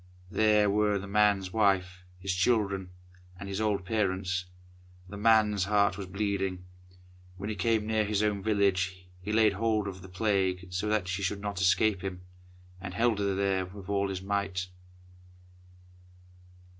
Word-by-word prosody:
There 105 -1 +4
were 105 0 +2
the 100 - -6
man's 100 -2 +2
wife, 90 -4 +1
his 95 +1 -2
children, 100 -1 +1 0.5
and 100 - -7
his 100 +2 -3
old 105 -3 0
parents. 95 -3 -1 0.6
The 100 - -9
man's 105 -2 +3
heart 100 -2 +2
was 100 -1 -6
bleeding! 95 -2 -2 0.7
When 100 +3 -4
he - - -3
came 110 +2 +1
near 110 0 +1
his 105 0 0
own 105 -2 0
village, 95 -3 0 0.2
he 105 - -4
laid 110 -1 +4
hold 110 0 0
of 95 -1 -7
the 95 - -11
Plague 95 -2 -1
so 95 +4 -1
that 105 -3 0
she 95 +1 -2
should 100 +2 -1
not 100 -2 -4
escape 95 +1 +3
him, 95 -2 -5 0.6
and 90 -2 -6
held 115 0 +2
her 100 -1 0
with 95 +1 -11
all 100 -1 0
his 95 -1 -4
might. 95 -2 -2
100 Hz, 155 wpm, -29 LUFS, 95-105 Hz, 0.7 s, There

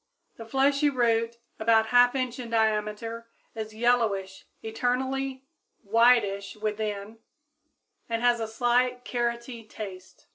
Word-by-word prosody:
_ - - -40
The 225 - -9
fleshy 280 +3 +2
root, 235 -3 +1 0.2
about 220 0 +3
1/2 245 +2 +5
inch 255 -1 -2
in 240 -2 -6
diameter, 220 +1 -1 0.2
is 220 -1 -6
yellowish 220 -5 0 0.2
externally, 260 +4 -2 0.4
whitish 210 -3 +3
within, 210 0 -4 0.9
and 230 0 -2
has 240 -1 +3
a 225 - -2
slight 245 +2 +1
carroty 235 -1 -3
taste. 190 -4 -9
230 Hz, 115 wpm, -27 LUFS, 220-245 Hz, 0.9 s, 1/2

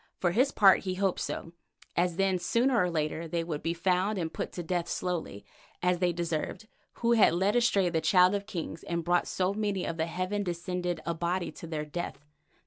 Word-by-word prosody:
For 175 - +1
his 255 +9 +3
part 195 -2 +6
he 185 -1 -3
hoped 190 -1 0
so, 165 - -4 0.4
as 175 0 +1
then 190 0 +1
sooner 240 +8 +2
or 180 -6 +3
later 160 0 -2
they 165 +1 -1
would 160 -3 -4
be 165 +1 -1
found 185 +4 +1
and 165 -3 -3
put - - -4
to 175 - -5
death 175 0 -2
slowly, 170 - -3 0.4
as 180 -1 +2
they 180 -1 +2
deserved, 170 +5 -3 0.3
who 235 0 0
had 225 -7 +5
led 195 +5 +2
astray 220 -6 +3
the 165 -2 0
Child 180 +3 +5
of 200 0 -2
Kings 165 -5 -5
and 170 -1 -2
brought 175 0 +2
so 185 +1 0
many 205 -3 -1
of 165 - -3
the 160 0 0
heaven 185 +4 -2
descended 180 -1 -3
Abati 170 +2 -1
to 165 - -10
their 155 -2 -3
death. 150 -2 -6
180 Hz, 205 wpm, -29 LUFS, 170-195 Hz, 0.4 s, part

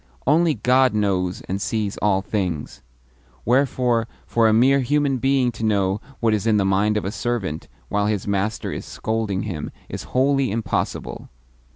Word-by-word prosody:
Only 155 +2 +3
God 130 -1 +3
knows 95 -3 0
and 95 +1 -4
sees 105 -2 -1
all 95 -2 +1
things; 95 -8 -3 0.6
wherefore 125 -2 +2 0.2
for 115 -1 +3
a - - +4
mere 130 +5 +4
human 140 +1 +1
being 135 -1 +2
to 115 0 -8
know 100 -2 +1 0.2
what 115 -2 +2
is 105 +1 -1
in 110 -1 +4
the 100 - +2
mind 100 +2 +2
of 105 - -2
a 95 - -2
servant 105 -10 -3 0.2
while 105 0 0
his 105 -2 -1
master 100 +2 -1
is - - -5
scolding 110 -4 -2
him 90 -8 -4 0.2
is - - -6
wholly 135 0 +3
impossible. 110 +2 -3
110 Hz, 165 wpm, -22 LUFS, 100-125 Hz, 0.6 s, a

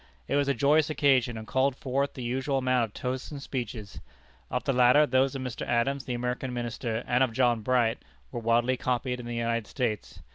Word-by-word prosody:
It - - 0
was 145 -1 +2
a 140 - +1
joyous 150 +2 +3
occasion, 130 -6 +2
and 110 - -7
called 130 +4 +1
forth 135 +1 -2
the 130 - -6
usual 130 +3 -1
amount 130 -2 +2
of 105 - -14
toasts 130 0 -3
and 145 - -7
speeches. 120 -7 -5 0.5
Of 125 - -2
the 135 - 0
latter, 125 +4 +6
those 135 0 +2
of 135 - -4
Mr. 125 -2 -5
Adams, 130 +3 0
the 125 - -2
American 125 +1 -3
Minister, 120 -1 -3
and 125 +2 +3
of 125 -3 0
John 120 -2 +2
Bright, 120 0 +1 0.3
were 120 - -4
widely 120 +2 +2
copied 125 0 -1
in 120 - -7
the 120 - -4
United 115 -1 -1
States. 120 -6 -3
125 Hz, 210 wpm, -28 LUFS, 120-135 Hz, 0.5 s, latter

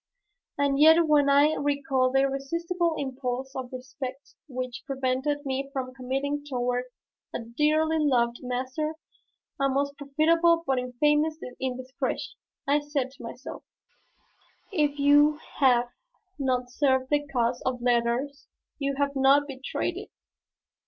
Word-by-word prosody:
And 280 -1 +1
yet 320 +2 +7
when 290 -2 +4
I 285 +2 +5
recall 275 -3 +1
the 270 +1 +3
irresistible 335 +5 -1
impulse 265 -1 -4
of 255 -2 -5
respect 260 +1 -7
which 255 -2 -5
prevented 270 +2 -1
me 270 0 -2
from 255 -2 -4
committing 270 +3 -2
toward 250 -3 -1 0.5
a - - -1
dearly 305 +7 +1
loved 240 -5 +2
master 260 +5 -3 0.6
a 275 0 +2
most 280 +1 0
profitable 330 +4 +3
but 265 -1 +1
infamous 295 +5 +1 0.2
indiscretion, 260 0 -3 0.3
I 285 +1 +4
say 290 -3 -2
to 270 - -16
myself, - - -8 1.1
"If 295 -6 +1
you 290 +1 +5 0.2
have 245 -3 +4 0.5
not 250 -2 -1
served 260 -1 +1
the 290 0 +1
cause 245 -2 0
of 255 -1 -1
letters, 245 +4 0 0.3
you 275 -1 -1
have 280 0 -1
not 275 +2 +5
betrayed 270 -1 -3
it." - - -8
275 Hz, 125 wpm, -27 LUFS, 255-290 Hz, 1.1 s, yet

